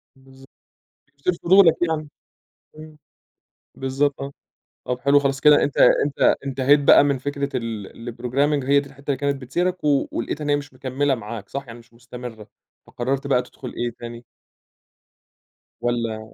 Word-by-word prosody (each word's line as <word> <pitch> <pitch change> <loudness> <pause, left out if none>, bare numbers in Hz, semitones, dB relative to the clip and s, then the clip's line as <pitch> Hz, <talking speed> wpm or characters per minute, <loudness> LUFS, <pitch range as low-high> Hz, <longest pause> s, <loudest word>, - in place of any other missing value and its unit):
بالضبط، 135 0 -18 0.7
يثير 180 - +1
فضولك 180 -2 +6
يعني، 155 -2 -2 0.7
إمم، 155 0 -12 0.8
بالضبط 135 +2 -1
آه، 140 0 -5 0.6
طَب 125 0 -2
حلو 140 +2 +4
خلاص 135 -1 -1
كده 150 -1 +6
أنت 145 - -2
أنت 140 -1 +4
انتهيت 135 +2 +3
بقى 140 0 +6
من 140 -1 +1
فكرة 140 +1 -3
ال 115 0 -6
الprogramming 135 +4 0
هي 140 +1 +4
دي 140 0 -8
الحتّة 140 +1 -18
اللي 135 - -1
كانت 140 -1 -2
بتثيرك 175 +8 -2
و 145 -2 +2
ولقيت 150 +6 -4
إن 150 - -3
هي 145 - +4
مش 145 -1 -6
مكملة 135 +2 -1
معاك، 110 -3 -8
صح؟ 140 -1 -5
يعني 115 0 -10
مش 115 0 -21
مستمرة، 120 -2 -10 0.4
فقررت 135 +3 -3
بقى 130 -3 +3
تدخل 125 0 -10
إيه 120 0 -1
تاني؟ 120 0 -8 1.6
والّا 115 -2 -3
135 Hz, 155 wpm, -22 LUFS, 120-145 Hz, 1.6 s, فضولك